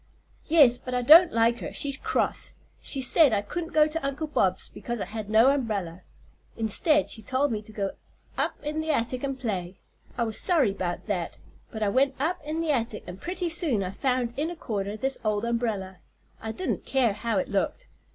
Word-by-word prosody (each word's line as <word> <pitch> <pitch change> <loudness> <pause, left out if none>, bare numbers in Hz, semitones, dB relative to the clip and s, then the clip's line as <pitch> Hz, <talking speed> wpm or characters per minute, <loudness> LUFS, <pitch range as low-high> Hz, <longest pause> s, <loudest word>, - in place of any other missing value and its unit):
"Yes; 285 -7 +5
but 255 0 -5
I 250 - 0
don't 330 +7 +8
like 230 +1 +2
her; - - -6
she's 280 -1 -1
cross. - - -2 0.3
She 275 - -1
said 275 0 +5
I 205 -1 +1
couldn't 335 - -5
go 305 -1 +5
to 310 +1 -4
Uncle 275 +3 -2
Bob's 190 -11 0
because 240 -1 -5
I - - -2
had 215 -1 -6
no 220 +4 +6
umbrella. 205 -11 -2 0.6
Instead 285 +7 +2
she 220 - -2
told 260 +6 0
me 215 -2 -2
to 215 - -13
go 200 -2 -2 0.4
up - - -1
in 305 +1 -2
the 315 - -5
attic 250 -2 0
and 270 -1 -3
play. 190 -7 -3 0.4
I 235 - +1
was 220 -2 -1
sorry 300 - +3
'bout 180 -3 -4
that, 185 -6 -3 0.3
but 220 -1 -4
I 205 - +2
went 265 +4 +2
up 325 +6 -1
in 310 +2 -3
the 325 -2 0
attic 230 -5 -1
and 180 +2 -9
pretty 360 0 -3
soon 310 - +1
I 185 - -4
found 250 +1 -1
in 305 +3 -1
a 345 - -6
corner 205 -7 -4
this 270 +4 -1
old 215 0 0
umbrella. 220 -6 -2 0.4
I 220 - -4
didn't 370 +11 -3
care 255 -6 +1
how 220 +1 -2
it 185 - -1
looked. 205 - -2
240 Hz, 205 wpm, -26 LUFS, 210-295 Hz, 0.6 s, don't